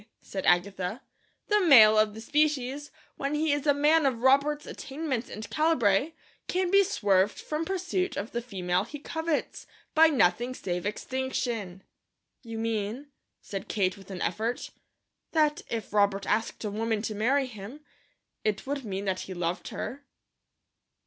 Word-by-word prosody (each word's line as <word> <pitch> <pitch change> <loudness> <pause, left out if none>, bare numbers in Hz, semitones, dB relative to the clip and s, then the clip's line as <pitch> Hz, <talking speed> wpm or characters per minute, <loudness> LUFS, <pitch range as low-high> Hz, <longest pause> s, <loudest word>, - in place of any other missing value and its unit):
said 190 - -4
Agatha. 185 +5 +1 0.4
"The 420 0 +3
male 220 -7 +9
of 215 -1 +3
the 220 - -8
species, 290 0 0 0.3
when 280 +2 -2
he 305 0 +2
is 290 +1 -2
a - - +7
man 300 +1 +4
of 245 -3 -2
Robert's 280 +3 +3
attainments 270 -4 -4
and 215 0 -7
calibre, 300 -4 +2 0.3
can 365 -1 0
be 395 0 +6
swerved 205 - +1
from 310 +1 -3
pursuit 370 0 -2
of 205 +3 -4
the 235 - -2
female 185 -5 -1
he 265 +7 -8
covets, 320 +1 -3 0.3
by 320 +1 +7
nothing 245 - +2
save 180 -2 -3
extinction." 230 -5 -3 0.6
"You 230 -3 -7
mean," 225 +5 -3 0.3
said 195 +1 -6
Kate 190 -4 0
with 195 -1 -15
an 185 -2 -4
effort, 220 +7 -2 0.6
"that 305 -2 +2
if 225 -3 -4
Robert 200 -1 +2
asked 225 +1 -1
a 210 - -2
woman 220 0 -1
to 220 - -2
marry 260 +7 +2
him, 235 +4 -9 0.6
it 210 -2 -1
would 280 0 -3
mean 200 -2 -4
that 190 -1 -1
he 190 - -6
loved 175 0 -2
her." 275 +3 -6
235 Hz, 155 wpm, -28 LUFS, 200-295 Hz, 0.6 s, male